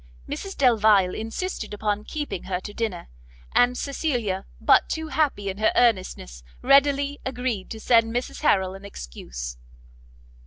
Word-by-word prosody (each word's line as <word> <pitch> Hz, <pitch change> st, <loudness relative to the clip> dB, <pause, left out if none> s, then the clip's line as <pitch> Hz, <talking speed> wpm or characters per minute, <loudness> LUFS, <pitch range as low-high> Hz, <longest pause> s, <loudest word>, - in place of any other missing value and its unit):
Mrs 390 Hz, 0 st, -6 dB
Delvile 215 Hz, -7 st, +4 dB
insisted 225 Hz, -, -4 dB
upon 210 Hz, 0 st, -2 dB
keeping 295 Hz, -, -5 dB
her 180 Hz, -1 st, -2 dB
to 205 Hz, -, -8 dB
dinner, 210 Hz, -7 st, -3 dB, 0.5 s
and 245 Hz, 0 st, +4 dB
Cecilia, 245 Hz, -, -2 dB
but -, -, +4 dB
too 320 Hz, 0 st, -3 dB
happy 270 Hz, -9 st, 0 dB
in 195 Hz, +1 st, -4 dB
her 215 Hz, -, +3 dB
earnestness, 185 Hz, -, +1 dB, 0.2 s
readily 280 Hz, +1 st, +4 dB
agreed 250 Hz, -6 st, -3 dB
to 220 Hz, -, -6 dB
send 230 Hz, 0 st, +3 dB
Mrs 245 Hz, +2 st, -3 dB
Harrel 190 Hz, -10 st, +2 dB
an 195 Hz, +1 st, -11 dB
excuse. -, -, -7 dB
220 Hz, 140 wpm, -24 LUFS, 195-265 Hz, 0.5 s, Delvile